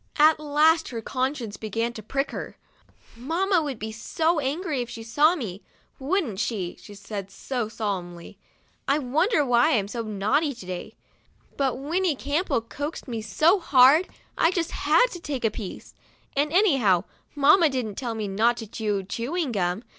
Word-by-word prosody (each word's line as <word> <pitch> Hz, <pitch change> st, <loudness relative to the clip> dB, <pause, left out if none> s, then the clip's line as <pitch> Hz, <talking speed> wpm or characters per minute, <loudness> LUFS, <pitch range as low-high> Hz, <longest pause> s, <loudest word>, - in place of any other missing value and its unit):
At 305 Hz, +1 st, +5 dB
last 305 Hz, +2 st, +3 dB
her 235 Hz, -, -5 dB
conscience 255 Hz, -3 st, -3 dB
began 230 Hz, +3 st, -2 dB
to 220 Hz, -, -8 dB
prick 275 Hz, +6 st, -2 dB
her. -, -, -7 dB, 0.3 s
' -, -, -31 dB
Mamma 335 Hz, -, +1 dB
would 285 Hz, -5 st, -4 dB
be 220 Hz, +1 st, -5 dB
so 320 Hz, +9 st, 0 dB
angry 295 Hz, 0 st, -2 dB
if 240 Hz, -, -5 dB
she 225 Hz, -, -8 dB
saw 295 Hz, +9 st, +3 dB
me, 205 Hz, -, -6 dB, 0.4 s
wouldn't 275 Hz, -, -1 dB
she?" 210 Hz, -5 st, -2 dB
she 205 Hz, -, -12 dB
said 200 Hz, -1 st, -6 dB
to 200 Hz, +7 st, -8 dB
us, 225 Hz, -3 st, -2 dB
solemnly. 180 Hz, -6 st, -5 dB, 0.2 s
" -, -, -39 dB
I 280 Hz, -, +3 dB
wonder 300 Hz, -, +1 dB
why 245 Hz, +3 st, +4 dB
I'm 200 Hz, -2 st, -1 dB
so 230 Hz, +3 st, -4 dB
naughty 225 Hz, +8 st, 0 dB
to 210 Hz, -, -11 dB
day. 180 Hz, -1 st, -6 dB, 0.6 s
But 270 Hz, -3 st, 0 dB
Winnie 325 Hz, +4 st, 0 dB
Campbell 285 Hz, 0 st, -1 dB
coaxed 285 Hz, +8 st, -6 dB
me 230 Hz, -3 st, -4 dB
so 315 Hz, -, +3 dB
hard, 285 Hz, +2 st, +5 dB, 0.3 s
I 330 Hz, -, +5 dB
just 345 Hz, -2 st, -1 dB
had -, -, +3 dB
to 350 Hz, -, -7 dB
take 285 Hz, -7 st, -3 dB
a 220 Hz, -, +2 dB
piece. 205 Hz, -3 st, -8 dB, 0.4 s
And, 290 Hz, +2 st, +1 dB
anyhow, 270 Hz, -, +3 dB, 0.3 s
mamma 305 Hz, +4 st, +5 dB
didn't 250 Hz, -6 st, -3 dB
tell 235 Hz, +1 st, -4 dB
me 215 Hz, -2 st, -3 dB
not 225 Hz, +5 st, +2 dB
to 225 Hz, -, -6 dB
chew 210 Hz, -2 st, -2 dB
chewing 255 Hz, -, -3 dB
gum. 185 Hz, 0 st, -1 dB
255 Hz, 175 wpm, -25 LUFS, 215-305 Hz, 0.6 s, At